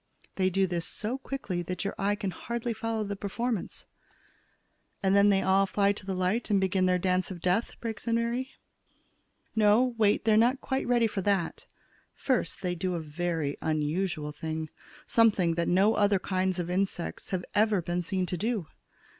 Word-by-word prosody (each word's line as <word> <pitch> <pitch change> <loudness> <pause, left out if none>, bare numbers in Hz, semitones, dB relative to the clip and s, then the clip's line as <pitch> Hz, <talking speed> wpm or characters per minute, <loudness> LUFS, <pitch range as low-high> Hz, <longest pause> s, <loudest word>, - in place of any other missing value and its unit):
They 185 -1 +1
do 195 +1 +2
this 175 -2 -2
so 235 +5 -3
quickly 260 -10 -4
that 180 +3 -4
your 200 - -1
eye 205 +1 0
can 200 -3 -3
hardly 235 +5 -3
follow 225 0 -2
the 200 -1 -4
performance." 215 +2 -3 1.2
"And 190 0 +3
then 200 +1 +6
they 195 -1 +3
all 195 +1 +3
fly 200 +1 +2
to 205 -1 -6
the 190 - -1
light 185 +7 0
and 200 -2 +3
begin 190 -1 +2
their 180 0 +3
dance 185 0 0
of 185 -3 -7
death," 185 +6 0
breaks 230 0 -5
in 230 - +2
Mary. 235 +3 -1 1.1
"No, 220 +4 +4
wait; 210 0 +3
they 220 - +4
are - - +5
not 235 +3 +5
yet 270 - -20
quite 265 0 -2
ready 240 -1 +3
for 210 -3 -2
that. 190 -3 -1 0.5
First, 255 -5 -1
they 180 -1 0
do 180 +1 -2
a - - -2
very 160 -1 -2
unusual 155 0 -1
thing; 155 +1 -5 0.3
something 205 -7 +3
that 170 0 -1
no 195 +5 +4
other 205 -1 +3
kinds 185 0 -1
of 175 0 -3
insects 185 -2 -2
have 185 -2 -2
ever 210 -1 +3
been 175 +1 -2
seen 185 +1 -1
to 180 0 -3
do. 215 -2 -1
195 Hz, 190 wpm, -29 LUFS, 180-220 Hz, 1.2 s, then